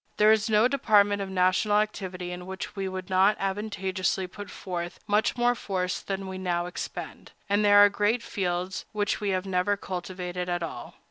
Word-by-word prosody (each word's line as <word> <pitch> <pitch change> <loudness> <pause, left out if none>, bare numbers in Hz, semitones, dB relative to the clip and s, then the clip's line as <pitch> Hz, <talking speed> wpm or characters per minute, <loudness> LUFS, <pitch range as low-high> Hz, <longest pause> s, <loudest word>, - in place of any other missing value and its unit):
There 210 +1 +6
is 220 0 +2
no 215 +2 +5
department 205 -6 +3
of 195 - -4
national 190 +3 +2
activity 185 -4 -2
in 180 0 -7
which 190 +1 -6
we 195 -1 -2
could 185 -1 -6
not 190 +3 +4
advantageously 190 -2 -1
put 205 +3 -9
forth 175 -1 -5
much 210 +3 +1
more 240 0 +3
force 185 -6 -2
than 195 0 -4
we 190 0 -6
now 175 -2 -1
expend; 180 - -7
and 205 +1 +2
there 205 0 +6
are 205 0 +9
great 210 +4 +1
fields 185 -3 -2
which 210 0 -1
we 205 - 0
have 185 0 0
never 190 +2 +1
cultivated 180 -1 -5
at 175 -1 -1
all. 165 - -7
190 Hz, 185 wpm, -27 LUFS, 180-205 Hz, -, are